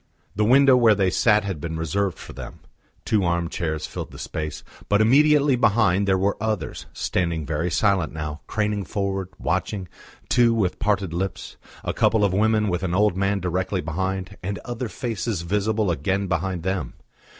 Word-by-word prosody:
The 105 Hz, -, +1 dB
window 135 Hz, +3 st, +6 dB
where 115 Hz, -4 st, +5 dB
they 95 Hz, -2 st, +1 dB
sat 105 Hz, 0 st, +3 dB
had 95 Hz, -7 st, -4 dB
been 80 Hz, 0 st, -4 dB
reserved 90 Hz, +4 st, -1 dB
for -, -, -10 dB
them; -, -, -9 dB, 0.4 s
two 105 Hz, -3 st, +2 dB
arm 85 Hz, -1 st, 0 dB
chairs 80 Hz, -3 st, -3 dB
filled -, -, -6 dB
the -, -, -12 dB
space, 75 Hz, -1 st, -5 dB, 0.3 s
but 105 Hz, -, +4 dB
immediately 145 Hz, +4 st, +5 dB
behind 100 Hz, -4 st, +3 dB
there 95 Hz, -1 st, +3 dB
were 100 Hz, +2 st, 0 dB
others, 110 Hz, -2 st, -3 dB
standing 85 Hz, -4 st, -1 dB
very 80 Hz, +3 st, -1 dB
silent 95 Hz, -3 st, +1 dB
now, 75 Hz, -1 st, -5 dB
craning 105 Hz, -1 st, -1 dB
forward, 95 Hz, -1 st, -2 dB
watching, 95 Hz, -4 st, -2 dB, 0.4 s
too, 120 Hz, -2 st, +4 dB
with 95 Hz, -5 st, 0 dB
parted 100 Hz, -5 st, 0 dB
lips: 95 Hz, +3 st, -4 dB, 0.3 s
a -, -, -2 dB
couple 110 Hz, -1 st, +3 dB
of 95 Hz, -, 0 dB
women 105 Hz, +1 st, +2 dB
with 90 Hz, -2 st, -1 dB
an 90 Hz, -2 st, -1 dB
old 105 Hz, -1 st, +3 dB
man 100 Hz, +1 st, 0 dB
directly 90 Hz, +1 st, -1 dB
behind, 95 Hz, +5 st, -3 dB
and 100 Hz, +2 st, -3 dB
other 120 Hz, 0 st, -4 dB
faces 115 Hz, -7 st, -3 dB
visible 105 Hz, +2 st, 0 dB
again 95 Hz, +6 st, -1 dB
behind 90 Hz, -1 st, -2 dB
them. 95 Hz, +1 st, -2 dB
100 Hz, 170 wpm, -23 LUFS, 90-110 Hz, 0.4 s, window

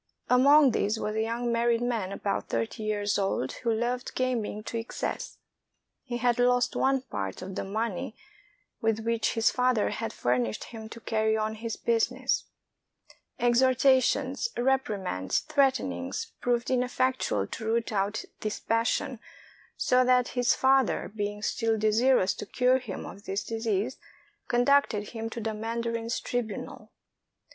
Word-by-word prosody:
Among 275 Hz, +2 st, +6 dB
these 215 Hz, 0 st, 0 dB
was 215 Hz, -, -2 dB
a 220 Hz, -, +1 dB
young 235 Hz, +2 st, -1 dB
married 235 Hz, 0 st, +2 dB
man 225 Hz, -6 st, -1 dB
about 200 Hz, 0 st, -2 dB
thirty 115 Hz, -, -2 dB
years 205 Hz, -1 st, 0 dB
old 195 Hz, -10 st, 0 dB
who 235 Hz, -, +1 dB
loved 240 Hz, +3 st, -2 dB
gaming 235 Hz, -5 st, -1 dB
to 230 Hz, -, -3 dB
excess. 225 Hz, -, -4 dB, 0.6 s
He 240 Hz, -2 st, -4 dB
had 245 Hz, 0 st, +1 dB
lost 245 Hz, 0 st, +3 dB
one 270 Hz, 0 st, +2 dB
part 100 Hz, -, -5 dB
of 190 Hz, +1 st, -6 dB
the -, -, -3 dB
money 215 Hz, 0 st, -3 dB, 0.7 s
with 225 Hz, 0 st, +1 dB
which 230 Hz, -1 st, 0 dB
his 225 Hz, +1 st, +3 dB
father 250 Hz, -3 st, +2 dB
had 225 Hz, -1 st, -3 dB
furnished 120 Hz, -, -1 dB
him 220 Hz, -2 st, -9 dB
to 230 Hz, -, -9 dB
carry 220 Hz, -1 st, +1 dB
on 215 Hz, 0 st, -1 dB
his 225 Hz, 0 st, -5 dB
busi 230 Hz, +1 st, +1 dB
ness; 260 Hz, 0 st, 0 dB, 0.9 s
exhortations, 260 Hz, -, +3 dB
reprimands, 210 Hz, -, 0 dB
threatenings, 270 Hz, -, 0 dB
proved 245 Hz, 0 st, 0 dB
ineffectual 255 Hz, -, +1 dB
to 220 Hz, -, -7 dB
root 230 Hz, +1 st, 0 dB
out 205 Hz, +1 st, -1 dB
this 215 Hz, -1 st, -3 dB
passion, 230 Hz, +1 st, 0 dB, 0.6 s
so 250 Hz, 0 st, +3 dB
that 250 Hz, -1 st, +3 dB
his 245 Hz, -1 st, +2 dB
father, 265 Hz, -5 st, +2 dB
being 205 Hz, 0 st, -3 dB
still 225 Hz, 0 st, 0 dB
desirous 220 Hz, -1 st, +3 dB
to -, -, -7 dB
cure 255 Hz, +1 st, +3 dB
him 225 Hz, -7 st, -6 dB
of 200 Hz, -, -10 dB
this 195 Hz, +2 st, -2 dB
disease, 225 Hz, +1 st, -2 dB, 0.5 s
conducted 245 Hz, -4 st, +2 dB
him 225 Hz, -1 st, -5 dB
to 235 Hz, -, -6 dB
the 220 Hz, -1 st, -2 dB
mandarin's 230 Hz, +1 st, -2 dB
tribunal. 240 Hz, -3 st, -4 dB
230 Hz, 145 wpm, -28 LUFS, 215-250 Hz, 0.9 s, Among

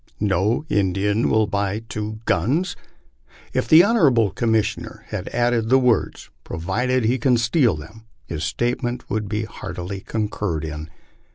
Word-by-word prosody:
" -, -, -34 dB
No 105 Hz, -, +1 dB
Indian 100 Hz, +1 st, +1 dB
will 110 Hz, 0 st, +3 dB
buy 100 Hz, +1 st, -2 dB
two 110 Hz, -1 st, -5 dB
guns! 175 Hz, -, +1 dB, 0.4 s
" -, -, -43 dB, 0.3 s
If -, -, 0 dB
the 160 Hz, +2 st, +8 dB
honorable 140 Hz, -, +3 dB
Commissioner 110 Hz, -3 st, -1 dB
had -, -, -4 dB
added 120 Hz, -2 st, +1 dB
the 130 Hz, -, +6 dB
words, 125 Hz, -3 st, 0 dB
provided 125 Hz, +10 st, -1 dB
he 125 Hz, +4 st, +2 dB
can 125 Hz, 0 st, +3 dB
steal 115 Hz, -, +2 dB
them, 95 Hz, +9 st, -11 dB, 0.2 s
his 75 Hz, +5 st, -5 dB
statement 120 Hz, -, -2 dB
would 105 Hz, -1 st, -2 dB
be 105 Hz, +1 st, -1 dB
heart -, -, -8 dB
ily 95 Hz, +2 st, -4 dB
concurred 105 Hz, -6 st, -3 dB
in. 75 Hz, 0 st, -6 dB
110 Hz, 155 wpm, -22 LUFS, 100-120 Hz, 0.4 s, the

